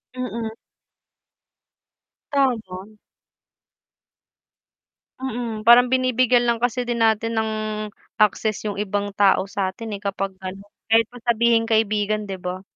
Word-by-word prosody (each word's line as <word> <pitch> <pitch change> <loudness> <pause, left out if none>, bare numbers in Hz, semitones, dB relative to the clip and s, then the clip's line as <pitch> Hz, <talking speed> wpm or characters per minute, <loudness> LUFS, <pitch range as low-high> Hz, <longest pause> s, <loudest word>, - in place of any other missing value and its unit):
Mm. 235 -3 -4 1.8
Tama. 215 -7 -1 2.2
Mm, 235 -4 -4
parang 245 +1 +7
binibigyan 255 -1 +3
lang 235 -1 0
kasi 245 0 0
din 235 -1 -2
natin 225 +1 +2
ng 220 0 0 0.7
access 215 +1 +2
yung 200 - -5
ibang 205 0 -2
tao 195 -1 +3
satin 200 +3 -3
eh, - - -18
kapag 195 -1 -3
ano, 190 +1 -6 0.3
kahit 225 0 +4
pa 245 - -13
sabihing 235 -1 +3
kaibigan 215 -2 0
'di 190 - -4
ba? 180 +1 -5
220 Hz, 115 wpm, -22 LUFS, 205-240 Hz, 2.2 s, parang